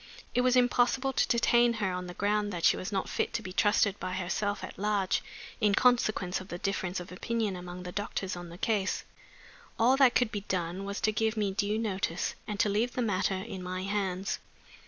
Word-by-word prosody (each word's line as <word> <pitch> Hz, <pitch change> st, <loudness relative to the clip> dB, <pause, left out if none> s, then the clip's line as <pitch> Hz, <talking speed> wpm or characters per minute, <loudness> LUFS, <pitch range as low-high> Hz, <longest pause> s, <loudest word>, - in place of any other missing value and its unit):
It 245 Hz, -, +3 dB
was 250 Hz, 0 st, +3 dB
impossible 250 Hz, +2 st, +3 dB
to -, -, +2 dB
detain 235 Hz, 0 st, +4 dB
her 210 Hz, -4 st, -1 dB
on 180 Hz, 0 st, -4 dB
the 180 Hz, -, -8 dB
ground 205 Hz, +1 st, +1 dB
that 175 Hz, -3 st, -1 dB
she -, -, +6 dB
was 185 Hz, -, -5 dB
not 195 Hz, -2 st, -1 dB
fit -, -, -1 dB
to -, -, -2 dB
be 185 Hz, -, -7 dB
trusted 205 Hz, 0 st, +3 dB
by 185 Hz, 0 st, -3 dB
herself 195 Hz, +3 st, -2 dB
at -, -, -8 dB
large, 205 Hz, -2 st, +1 dB, 0.4 s
in 210 Hz, -3 st, +3 dB
consequence 215 Hz, -7 st, +2 dB
of 185 Hz, -, -10 dB
the 175 Hz, -, -5 dB
difference 190 Hz, -1 st, -2 dB
of 180 Hz, -, -9 dB
opinion 215 Hz, +1 st, -1 dB
among 180 Hz, 0 st, -7 dB
the 180 Hz, -, -6 dB
doctors 195 Hz, -1 st, -3 dB
on 175 Hz, -1 st, -8 dB
the 170 Hz, -, -10 dB
case. 205 Hz, -2 st, 0 dB, 0.7 s
All 245 Hz, +4 st, +5 dB
that 265 Hz, -3 st, +5 dB
could 245 Hz, -3 st, +3 dB
be 205 Hz, -, -3 dB
done 185 Hz, -1 st, -3 dB
was 200 Hz, 0 st, -4 dB
to 215 Hz, -, +3 dB
give 220 Hz, +1 st, 0 dB
me 205 Hz, -2 st, +1 dB
due 205 Hz, +2 st, 0 dB
notice, 195 Hz, -6 st, -1 dB
and 210 Hz, -1 st, -4 dB
to -, -, +3 dB
leave 220 Hz, +5 st, +1 dB
the 250 Hz, -, 0 dB
matter 195 Hz, -2 st, +1 dB
in 190 Hz, 0 st, -5 dB
my 185 Hz, +1 st, -4 dB
hands. 195 Hz, -1 st, -1 dB
200 Hz, 215 wpm, -30 LUFS, 185-225 Hz, 0.7 s, she